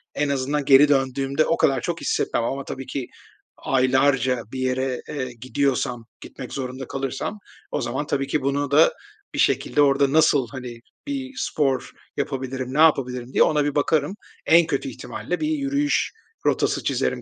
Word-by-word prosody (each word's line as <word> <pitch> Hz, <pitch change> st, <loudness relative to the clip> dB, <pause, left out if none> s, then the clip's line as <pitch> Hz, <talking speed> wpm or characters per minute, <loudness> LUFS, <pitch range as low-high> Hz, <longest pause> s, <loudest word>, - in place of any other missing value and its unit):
en 145 Hz, 0 st, 0 dB
azından 140 Hz, +1 st, -1 dB
geri 140 Hz, +2 st, +7 dB
döndüğümde, 135 Hz, +1 st, +1 dB
o 165 Hz, -, +1 dB
kadar 135 Hz, -3 st, +2 dB
çok 170 Hz, -1 st, -3 dB
hissetmem 115 Hz, -, 0 dB
ama 135 Hz, +3 st, -2 dB
tabii 135 Hz, 0 st, -6 dB
ki 135 Hz, -3 st, -4 dB, 0.5 s
aylarca 130 Hz, -1 st, +2 dB
bir 130 Hz, -, -5 dB
yere, 130 Hz, 0 st, -1 dB
eee, 130 Hz, -4 st, -4 dB
gidiyorsam, 125 Hz, -2 st, -1 dB, 0.2 s
gitmek -, -, -9 dB
zorunda 130 Hz, -1 st, -5 dB
kalırsam 135 Hz, +9 st, -4 dB, 0.3 s
o -, -, -1 dB
zaman, 130 Hz, +5 st, -2 dB
tabii 135 Hz, -1 st, -1 dB
ki 150 Hz, +2 st, 0 dB
bunu 140 Hz, +1 st, -1 dB
da 150 Hz, +3 st, +5 dB, 0.4 s
bir -, -, -4 dB
şekilde 145 Hz, -, +2 dB
orada 140 Hz, -1 st, +3 dB
nasıl, 150 Hz, -5 st, +4 dB
hani, 125 Hz, -3 st, -7 dB, 0.3 s
bir 270 Hz, -2 st, -4 dB
spor 140 Hz, -, -1 dB, 0.3 s
yapabilirim, 130 Hz, -2 st, -3 dB
ne 150 Hz, -, -1 dB
yapabilirim 125 Hz, -5 st, +2 dB
diye -, -, +5 dB
ona 150 Hz, -2 st, +2 dB
bir 145 Hz, -, -2 dB
bakarım. 155 Hz, +5 st, +1 dB, 0.3 s
En 165 Hz, 0 st, +5 dB
kötü -, -, -2 dB
ihtimalle -, -, -5 dB
bir 305 Hz, -, 0 dB
yürüyüş 285 Hz, -1 st, 0 dB, 0.3 s
rotası -, -, +1 dB
çizerim -, -, -1 dB
135 Hz, 160 wpm, -23 LUFS, 130-150 Hz, 0.5 s, geri